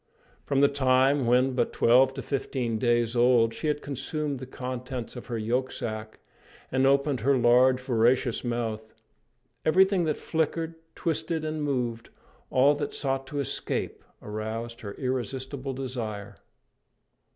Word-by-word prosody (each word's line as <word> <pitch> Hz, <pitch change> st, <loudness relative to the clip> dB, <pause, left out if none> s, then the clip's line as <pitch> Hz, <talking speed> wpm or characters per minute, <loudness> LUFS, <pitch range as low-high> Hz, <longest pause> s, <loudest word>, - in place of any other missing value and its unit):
From 140 Hz, -1 st, +2 dB
the 140 Hz, -, +7 dB
time 135 Hz, -1 st, +3 dB
when, 125 Hz, +2 st, +3 dB
but 125 Hz, -, 0 dB
twelve 130 Hz, +3 st, +5 dB
to 135 Hz, -, -5 dB
fifteen 125 Hz, -4 st, -2 dB
days 120 Hz, -1 st, +1 dB
old, 120 Hz, -2 st, +4 dB
she 155 Hz, -, -4 dB
had 150 Hz, -1 st, -1 dB
consumed 145 Hz, 0 st, -3 dB
the 130 Hz, -, -7 dB
contents 125 Hz, -1 st, -5 dB
of 120 Hz, -, -8 dB
her 120 Hz, -, -3 dB
yolksac, 110 Hz, -2 st, -3 dB, 0.5 s
and 130 Hz, +1 st, +3 dB
opened 140 Hz, -1 st, +2 dB
her 135 Hz, +4 st, +3 dB
large 125 Hz, +2 st, +5 dB
voracious 125 Hz, -1 st, +1 dB
mouth, 115 Hz, -2 st, -3 dB, 0.7 s
everything 190 Hz, +2 st, +4 dB
that 155 Hz, -2 st, 0 dB
flickered, 160 Hz, 0 st, -1 dB, 0.2 s
twisted 160 Hz, 0 st, -2 dB
and 155 Hz, 0 st, -3 dB
moved, 120 Hz, -5 st, -2 dB, 0.4 s
all 135 Hz, +3 st, +5 dB
that 145 Hz, 0 st, -4 dB
sought 135 Hz, -1 st, -1 dB
to 145 Hz, -, -4 dB
escape, 140 Hz, -, -2 dB, 0.2 s
aroused 110 Hz, +3 st, -5 dB
her 100 Hz, -2 st, -6 dB
irresistible 130 Hz, +1 st, -3 dB
desire. 115 Hz, -6 st, -5 dB
130 Hz, 135 wpm, -27 LUFS, 120-140 Hz, 0.7 s, the